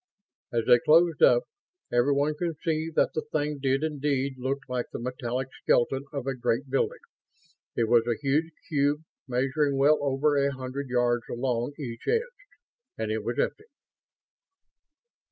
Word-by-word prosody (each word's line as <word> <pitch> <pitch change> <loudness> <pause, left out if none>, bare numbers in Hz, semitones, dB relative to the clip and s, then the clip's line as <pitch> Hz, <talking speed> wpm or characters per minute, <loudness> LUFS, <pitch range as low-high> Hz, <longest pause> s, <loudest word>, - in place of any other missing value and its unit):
As 115 -1 0
they 120 - +6
closed 165 +3 +4
up, 120 0 +6 0.5
everyone 140 +5 +2
could 165 0 -3
see 160 -1 0
that - - +2
the 155 - -1
thing 150 -1 -2
did 135 +1 +1
indeed 140 -3 -1
look 130 +2 -1
like 125 -2 -2
the - - -4
metallic 125 +1 -3
skeleton 135 +3 +2
of 140 -3 -4
a 135 - -1
great 130 +2 -1
building. 435 - +1 0.8
It 115 - +1
was 115 0 +4
a 120 -2 0
huge 150 +4 +1 0.2
cube, 145 -1 +1 0.2
measuring 135 +3 0
well 145 +3 +5
over 145 +1 +1
a 140 0 +2
hundred 130 +1 -5
yards 120 -1 +1
along 120 +1 -1
each 120 -6 -7
edge. - - -1 0.5
And 110 -1 -2
it 110 -1 -2
was 120 +2 -3
empty. 430 - -1
135 Hz, 155 wpm, -27 LUFS, 125-150 Hz, 0.8 s, they